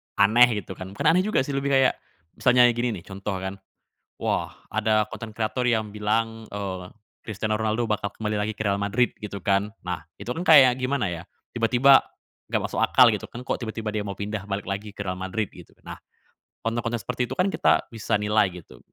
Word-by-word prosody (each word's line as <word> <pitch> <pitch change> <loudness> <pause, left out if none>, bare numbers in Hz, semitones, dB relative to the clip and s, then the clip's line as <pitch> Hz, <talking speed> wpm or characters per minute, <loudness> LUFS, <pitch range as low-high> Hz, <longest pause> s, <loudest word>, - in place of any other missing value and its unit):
aneh, 110 +2 +5
gitu 95 0 -10
kan 95 +1 -8
bukan - - +2
aneh 180 +3 +2
juga 215 -10 +2
sih 140 - -3
lebih 140 0 0
kayak 135 -1 +4 0.4
misalnya 125 -1 +5
gini 120 0 -1
nih - - -22
contoh 100 0 -5
kan, 95 +1 -5 0.6
"Wah, - - -1 0.2
ada 110 -1 +1
konten 110 +1 -7
kreator 115 +3 -2
yang 110 -3 +1
bilang, 110 +2 -1
eee, 95 -3 -4 0.4
Christiano 110 0 -2
Ronaldo 110 +2 0
bakal 100 -1 -1
kembali 105 -1 -3
lagi 105 +1 -1
ke 110 - -21
Real 100 - +2
Madrid," 110 +4 +2
gitu 100 -1 -5
kan. 100 +2 +1 0.2
Nah, 90 -1 -4 0.2
itu - - -8
kan 170 - -3
kayak 135 -7 +7
gimana 130 -2 -1
ya 85 -1 -5 0.3
tiba-tiba, 125 +4 +5 0.5
nggak - - +1
masuk - - -2
akal - - +6
gitu - - -5
kan 120 +1 -9
kok - - -2
tiba-tiba 110 -1 -4
dia 105 - -1
mau 100 -1 -6
pindah 105 0 -4
balik 100 -1 -3
lagi 100 +2 -4
ke 105 0 -7
Real 90 - -1
Madrid 95 +3 -2
gitu. - - -14 0.2
Nah, - - -7 0.7
konten-konten 115 +1 -1
seperti 125 0 -2
itu - - -5
kan 185 +1 +1
kita - - +2
bisa 115 -3 -3
nilai 105 0 +3 0.2
gitu. 65 -5 -16
110 Hz, 200 wpm, -25 LUFS, 100-120 Hz, 0.7 s, kayak